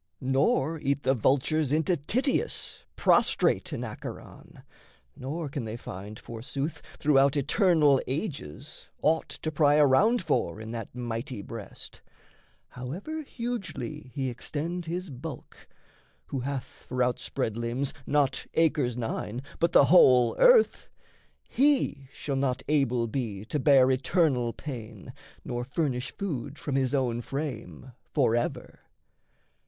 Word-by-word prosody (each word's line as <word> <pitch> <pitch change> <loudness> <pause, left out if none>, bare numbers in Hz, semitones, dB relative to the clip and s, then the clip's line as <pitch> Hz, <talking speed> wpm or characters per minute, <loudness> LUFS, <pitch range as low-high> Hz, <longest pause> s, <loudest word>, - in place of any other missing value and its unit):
Nor 135 +4 +1
eat 140 0 -1
the 135 - +3
vultures 140 +4 +1
into 160 +4 +2
Tityus 255 - -1
Prostrate - - +3
in - - -3
Acheron, - - -9 0.5
nor 150 +4 -4
can 140 -2 -4
they 110 +1 -5
find, 105 0 -8
Forsooth, 135 +8 -5 0.2
throughout 140 -1 +4
eternal 150 - +4
ages, 135 - -5
aught 160 +1 +2
To 155 - -4
pry 150 -1 +4
around 185 - +4
for 120 - 0
in 110 0 -7
that 115 0 -6
mighty 120 -1 -4
breast. 115 -3 -9 0.7
However 180 - -6
hugely 195 - -5
he 135 -3 -1
extend 165 +7 -4
his 175 0 -4
bulk 135 +2 -9 0.6
Who 135 - -4
hath 135 +1 -3 0.2
for 125 0 +1
outspread 120 -3 -1
limbs 120 +4 -2
not 145 -2 +1
acres 145 -7 +2
nine, 120 +1 -3 0.2
But 170 - +2
the - - +7
whole 130 -7 +6
earth - - +5 0.6
he 265 - +2
shall 140 0 -4
not 130 -1 0
able 130 -5 +2
be 110 -4 -4
To 150 - -2
bear 135 -2 +5
eternal 130 -3 +2
pain 115 -7 -8 0.3
nor 120 0 -3
furnish 130 -2 -2
food 145 -7 -4
From 145 - -4
his 135 0 +1
own 120 -3 0
frame 130 - -5 0.2
forever. 120 -5 0
135 Hz, 125 wpm, -28 LUFS, 125-155 Hz, 0.7 s, the